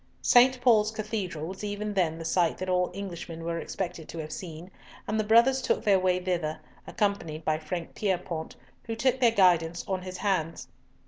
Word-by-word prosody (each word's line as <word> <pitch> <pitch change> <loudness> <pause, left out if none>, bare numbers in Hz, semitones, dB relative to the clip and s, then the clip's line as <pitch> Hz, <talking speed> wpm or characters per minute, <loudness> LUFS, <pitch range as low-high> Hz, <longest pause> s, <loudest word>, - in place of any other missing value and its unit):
St. 255 +1 +6
Paul's 220 -4 +5
Cathedral 210 -7 -4
was 190 +4 -7
even 210 0 -3
then 170 -5 +1
the 165 - -7
sight 170 0 +1
that 185 - -4
all 180 0 +2
Englishmen 170 -4 -6
were 170 0 -2
expected 175 -4 -5
to - - -7
have 155 -1 -5
seen, 170 0 -8 0.4
and 215 +1 0
the - - +2
brothers 235 +5 +5
took - - 0
their 200 -4 +4
way 185 -1 +2
thither, 175 -4 -2 0.3
accompanied 165 -7 -2
by 155 0 +1
Frank 165 +2 -5
Pierrepoint, 180 -5 -2 0.3
who 225 - -3
took 260 +2 +1
their 245 -2 +6
guidance 175 -5 +3
on 190 -1 -1
his 185 0 -7
hands. 180 -5 -1
185 Hz, 185 wpm, -28 LUFS, 165-210 Hz, 0.4 s, St